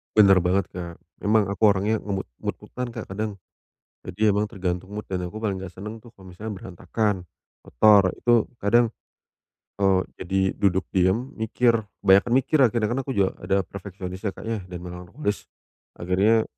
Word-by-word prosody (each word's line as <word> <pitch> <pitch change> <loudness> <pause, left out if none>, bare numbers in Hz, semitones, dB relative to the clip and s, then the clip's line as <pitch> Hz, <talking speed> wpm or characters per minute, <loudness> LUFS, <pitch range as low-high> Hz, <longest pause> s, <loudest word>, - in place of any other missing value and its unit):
Benar 100 -3 +7
banget, 90 +2 0
Kak! 85 -2 -6 0.2
Emang, 105 +1 +3
aku 105 0 +4
orangnya 105 +3 0
nge 95 -2 -3 0.2
mood-mood-an 125 0 -5
Kak, 110 -4 -8
kadang. 105 0 -3 0.7
Jadi, 105 +4 0
emang 105 +1 +3
tergantung 95 -2 -3
mood, 105 +1 -6
dan 90 -1 -3
aku 105 +5 -6
paling 105 -3 -1
enggak 95 -1 -7
senang, 105 +4 -8
kalau 100 -6 -15
misalnya, 105 +5 -7
berantakan, 95 +1 -2 0.4
kotor. 100 - +5
Itu, 120 -2 +2
kadang, 115 +3 +3 0.9
eee, 95 -1 +4 0.2
jadi 95 +1 0
duduk 95 -2 +1
diam 95 +8 +1
mikir 115 +1 +1 0.2
kebanyakan 100 +5 +5
mikir 150 +3 +2
akhirnya, 115 -3 +3
kan, 130 - -1
aku 135 -1 -4
juga 95 -2 +2
ada 95 +1 +1
perfeksionis 95 -1 -8
ya, 100 -3 -2
Kak, - - -9
ya, 115 -2 -2
dan 90 - -6
memang 90 0 -8
harus 125 -9 -2 0.5
akhirnya, 100 +6 +2
100 Hz, 165 wpm, -24 LUFS, 95-110 Hz, 0.9 s, Benar